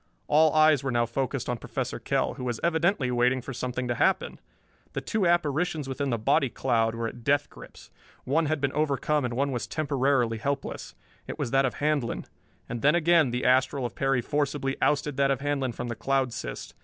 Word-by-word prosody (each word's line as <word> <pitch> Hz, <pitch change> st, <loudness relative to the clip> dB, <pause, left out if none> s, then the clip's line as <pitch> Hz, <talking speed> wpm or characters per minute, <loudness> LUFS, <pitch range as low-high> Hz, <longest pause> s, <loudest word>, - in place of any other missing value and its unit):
All 155 Hz, +1 st, +5 dB
eyes 155 Hz, -3 st, +5 dB
were 135 Hz, -, -1 dB
now 120 Hz, -1 st, +2 dB
focused 130 Hz, +1 st, -3 dB
on 120 Hz, -1 st, -2 dB
Professor -, -, -4 dB
Kell, -, -, 0 dB
who -, -, -8 dB
was 120 Hz, -2 st, -2 dB
evidently 170 Hz, -5 st, +1 dB
waiting 125 Hz, +1 st, +2 dB
for 130 Hz, +2 st, -7 dB
something 125 Hz, 0 st, -3 dB
to 120 Hz, -, 0 dB
happen. -, -, 0 dB, 0.5 s
The -, -, -3 dB
two 210 Hz, -5 st, 0 dB
apparitions 160 Hz, -2 st, +1 dB
within 135 Hz, +1 st, -2 dB
the 120 Hz, -, 0 dB
body 135 Hz, +5 st, +2 dB
cloud 115 Hz, -3 st, 0 dB
were 115 Hz, 0 st, -2 dB
at 120 Hz, +1 st, -9 dB
death 145 Hz, +3 st, +1 dB
grips. -, -, -14 dB, 0.3 s
One 155 Hz, +4 st, +1 dB
had 155 Hz, 0 st, 0 dB
been 140 Hz, -1 st, -1 dB
overcome 150 Hz, -1 st, 0 dB
and 120 Hz, -1 st, -3 dB
was 135 Hz, -2 st, -1 dB
temporarily 135 Hz, -6 st, 0 dB
helpless. 140 Hz, +3 st, -4 dB, 0.3 s
It -, -, -6 dB
was 115 Hz, -, -3 dB
that 135 Hz, 0 st, +3 dB
of -, -, -5 dB
Handlon. 145 Hz, -5 st, -1 dB, 0.4 s
And 120 Hz, -1 st, -5 dB
then 150 Hz, +3 st, +4 dB
again 170 Hz, -4 st, +4 dB
the 125 Hz, +1 st, -2 dB
astral 130 Hz, +1 st, +2 dB
of 120 Hz, -, -4 dB
Perry 135 Hz, -2 st, +1 dB
forcibly 140 Hz, 0 st, -1 dB
ousted 145 Hz, -1 st, +1 dB
that 140 Hz, 0 st, +3 dB
of 135 Hz, -2 st, +1 dB
Handlon 140 Hz, -3 st, -1 dB
from 120 Hz, -, -5 dB
the 120 Hz, -, -4 dB
cloud 130 Hz, +2 st, 0 dB
cyst. -, -, -6 dB
135 Hz, 200 wpm, -27 LUFS, 125-150 Hz, 0.5 s, All